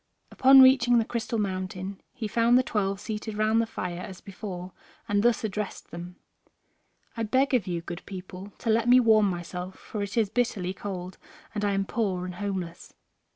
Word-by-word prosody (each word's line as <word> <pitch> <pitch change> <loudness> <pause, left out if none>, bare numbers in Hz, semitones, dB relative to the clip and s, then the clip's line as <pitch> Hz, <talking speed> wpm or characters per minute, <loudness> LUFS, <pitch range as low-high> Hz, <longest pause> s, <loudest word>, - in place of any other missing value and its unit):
Upon 265 0 +8
reaching 245 -2 +6
the 225 - +2
Crystal 235 0 -3
Mountain 190 -1 -3
he 225 -4 -5
found 235 +3 +4
the 255 - +4
twelve 200 -4 -1
seated 215 0 -5
round 215 +1 +3
the 230 - -2
fire 180 -5 -4
as 185 0 -8
before, 185 -2 -7 0.4
and 205 -2 +2
thus 235 0 +2
addressed 210 -1 -4
them: 175 +1 -8 1.0
"I 230 - -4
beg 260 +5 +2
of 235 -8 +2
you, 170 -2 -2
good 175 +1 -7
people, 185 +1 -8
to 230 - -1
let 230 +2 +2
me 250 +1 +8
warm 220 -4 +5
myself, 180 +1 -5
for 210 - -6
it 200 +2 -4
is 215 -3 +2
bitterly 200 -7 0
cold, 185 -2 -6 0.3
and 210 - -3
I 205 -1 +1
am 195 0 0
poor 190 -5 -1
and 180 - -5
homeless." 185 -4 -5
205 Hz, 185 wpm, -27 LUFS, 185-230 Hz, 1.0 s, Upon